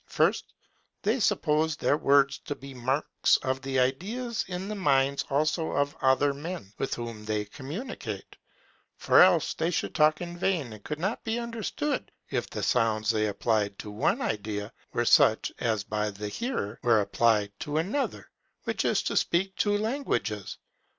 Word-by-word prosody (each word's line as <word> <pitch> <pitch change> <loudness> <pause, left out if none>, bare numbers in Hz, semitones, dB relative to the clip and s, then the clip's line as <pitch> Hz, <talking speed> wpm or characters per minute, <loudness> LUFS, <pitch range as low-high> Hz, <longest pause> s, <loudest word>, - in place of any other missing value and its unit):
First, - - +1 0.5
THEY 220 +6 +1
SUPPOSE 160 -6 +2
THEIR 145 - +1
WORDS 140 -2 +3
TO 145 - -5
BE 135 0 -10
MARKS 130 +3 +1
OF 130 0 -1
THE 135 -1 -1
IDEAS 215 - -1
IN 185 +1 -4
THE 215 - -3
MINDS 140 -7 +2
ALSO 155 +3 0
OF 145 +2 0
OTHER 135 +1 +3
MEN, 145 - -7
WITH 135 - -1
WHOM 115 -2 -6
THEY 105 -1 -1
COMMUNICATE; 150 - -7 0.6
for - - +5
else - - +5
they 165 - -1
should 175 - -2
talk 155 0 +4
in 175 -1 -6
vain, 170 - 0
and 105 -2 -12
could 150 - -4
not 195 +8 -2
be 225 +1 -1
understood, 235 +5 -3 0.2
if - - -1
the - - -5
sounds 110 -3 +2
they 110 -1 +1
applied 105 -1 0
to 105 - -7
one 105 - 0
idea 105 0 -3 0.2
were 120 - 0
such 110 -1 +5
as 110 -4 0
by 105 0 -1
the 105 +1 -6
hearer 120 - -3
were 115 -3 +4
applied 105 -1 +2
to 150 +1 -3
another, 200 - -2 0.3
which - - -1
is - - +2
to - - -2
speak 190 +3 +1
two 205 -1 +2
languages. 205 - -2
140 Hz, 165 wpm, -28 LUFS, 110-180 Hz, 0.6 s, for